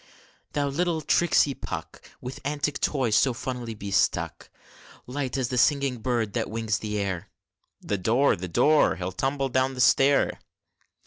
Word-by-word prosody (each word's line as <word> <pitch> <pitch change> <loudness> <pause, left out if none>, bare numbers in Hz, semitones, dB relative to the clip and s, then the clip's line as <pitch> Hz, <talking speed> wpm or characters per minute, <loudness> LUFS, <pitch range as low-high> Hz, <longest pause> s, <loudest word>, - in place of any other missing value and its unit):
Thou 145 -1 0
little 165 +3 -1
tricksy 155 -4 +3
Puck! - - -7 0.2
With 125 +2 -7
antic 145 +1 -2
toys 130 -7 +1
so 130 +4 +3
funnily 120 -2 -5
bestuck, 100 -2 -1 0.6
Light 130 0 -3
as 130 -2 -1
the 125 -2 0
singing 140 -2 +2
bird 115 -3 -1
that - - -2
wings 110 -1 -1
the 105 -1 -3
air 95 -4 -3 0.5
(The 100 - -2
door! 120 +9 +3
the 90 +1 -6
door! 150 - +3
he'll 90 0 -4
tumble 135 +7 -1
down 130 +1 +1
the - - -8
stair!) 135 +2 +4
125 Hz, 150 wpm, -26 LUFS, 110-140 Hz, 0.6 s, stair